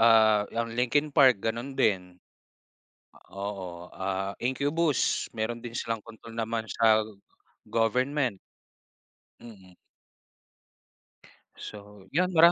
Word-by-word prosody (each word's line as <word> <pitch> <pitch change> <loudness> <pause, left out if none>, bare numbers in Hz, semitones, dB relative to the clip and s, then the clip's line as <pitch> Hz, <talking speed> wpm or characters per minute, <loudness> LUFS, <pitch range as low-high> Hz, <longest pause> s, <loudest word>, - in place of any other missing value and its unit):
ah, 110 -2 +5
'yang 115 0 -3
Linkin 140 +5 +1
Park 130 -8 +5
gano'n 120 +4 -3
din. 90 -3 +1 1.1
Oo, 95 -3 -6
ah, 95 +1 -2
Incubus 145 +4 +1
meron 115 +2 -2
din 120 -1 -6
silang 115 -2 -2
kontrol 115 0 -12
naman 115 0 -2
sa 110 -1 +4 0.7
government. 125 0 +1 1.0
Mm. 95 -6 -13 1.8
So, 105 -2 -11
'yon 180 +4 +1
mara 170 +1 +8
115 Hz, 95 wpm, -28 LUFS, 105-125 Hz, 1.8 s, mara